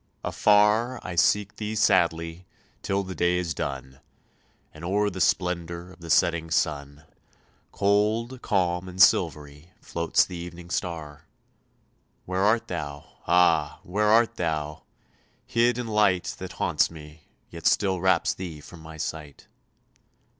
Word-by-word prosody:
Afar 105 +4 +3
I 90 - -5
seek 100 +3 +2
thee 110 0 -4
sadly, 85 -3 +1 0.3
till 100 0 -1
the 95 -1 -6
day 90 0 +1
is 85 -2 -2
done, 65 -2 -5 0.7
And 75 - -12
o'er 100 +3 0
the 95 0 -5
splendour 85 0 -1
of 90 - -17
the 85 -1 -10
setting 80 +2 +2
sun, 75 -2 -2 0.7
Cold, 110 +5 0
calm, 90 -2 0
and 90 +1 -10
silvery, 75 -2 +2
floats 85 -5 +1
the 90 - -9
evening 85 0 -9
star; 80 -6 -5 1.0
Where 95 +1 -2
art 110 +3 +2
thou? 75 -4 -7
Ah! 85 -4 +3
where 105 +4 0
art 115 +2 +3
thou, 75 -3 -3 0.6
hid 120 +1 +2
in 125 - -3
light 105 -5 +1
That - - -7
haunts - - +1
me, 75 -1 -13 0.2
yet 85 -1 -2
still 95 -3 +2
wraps 95 -2 +2
thee 85 -5 -7
from 85 +3 -13
my 80 0 -11
sight? 75 -2 -6
90 Hz, 135 wpm, -26 LUFS, 80-100 Hz, 1.0 s, Afar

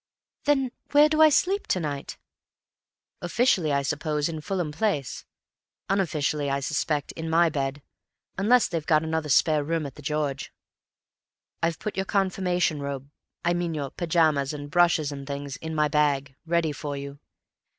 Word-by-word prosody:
"Then 270 -4 +2 0.2
where 295 +1 +7
do 310 0 +2
I 315 - +9
sleep 385 +7 +1
to 185 - +1
night?" 145 -4 -4 1.0
"Officially, 175 - +2
I 140 0 +1
suppose, 150 +1 -1
in 160 -2 -5
Fulham 175 -2 -2
Place; 150 - -2 0.6
unofficially, 155 -6 0
I 140 0 0
suspect, 145 +1 -1
in 160 0 -6
my 165 +1 +4
bed, 140 -1 -3 0.5
unless 230 +5 +4
they've 165 -3 -3
got 155 -1 +4
another 160 -1 -2
spare 150 +3 +4
room 165 +1 -1
at 140 - -7
'The 150 - -13
George.' 145 -2 -2 1.1
I've 165 -1 0
put 215 - -5
your 190 0 -1
confirmation 180 -5 +1
robe—I 140 +5 -5
mean 175 -2 -2
your 140 -3 -3
pyjamas 155 -5 +1
and 145 -1 -7
brushes 165 -3 +3
and 140 -1 -7
things—in 145 +3 -5
my 150 -1 +3
bag, 145 -3 +1
ready 170 -2 +1
for 145 0 -5
you. 140 0 -7
155 Hz, 150 wpm, -26 LUFS, 145-175 Hz, 1.1 s, I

